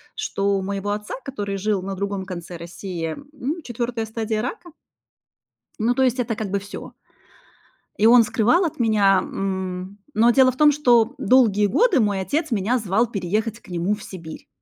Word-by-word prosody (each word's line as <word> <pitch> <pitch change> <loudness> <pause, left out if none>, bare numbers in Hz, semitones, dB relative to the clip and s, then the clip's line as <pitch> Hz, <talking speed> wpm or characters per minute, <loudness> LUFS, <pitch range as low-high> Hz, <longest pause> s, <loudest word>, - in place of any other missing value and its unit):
что 200 - -1
у - - -3
моего 200 +1 -3
отца, 210 0 -4
который 205 -7 -4
жил 200 0 0
на 195 +1 -5
другом 200 0 -3
конце 175 -2 -7
России, 170 -1 -5 0.2
м, 300 +4 -4
4 235 -2 -3
стадия 220 -1 -2
рака. 345 +7 -6 1.1
Ну, 230 +3 +2
то 265 - 0
есть 255 0 +1
это 235 -2 -1
как 210 -2 -4
бы 200 +1 0
всё. 200 +1 -9 1.0
И 210 - +2
он 235 +1 +8
скрывал 235 - +2
от 315 - -4
меня. 205 -4 +4
М, 190 0 -4 0.2
но 230 +2 +4
дело 260 +1 +5
в 255 - -15
том, 300 +1 +6
что 245 -4 +3
долгие 225 -5 +4
годы 380 - +3
мой 205 -4 +1
отец 300 - -2
меня 225 +3 +1
звал 215 +1 +1
переехать 215 +2 -2
к - - -19
нему 180 +3 0
в 210 - -12
Сибирь. 165 -4 -10
215 Hz, 175 wpm, -22 LUFS, 195-245 Hz, 1.1 s, он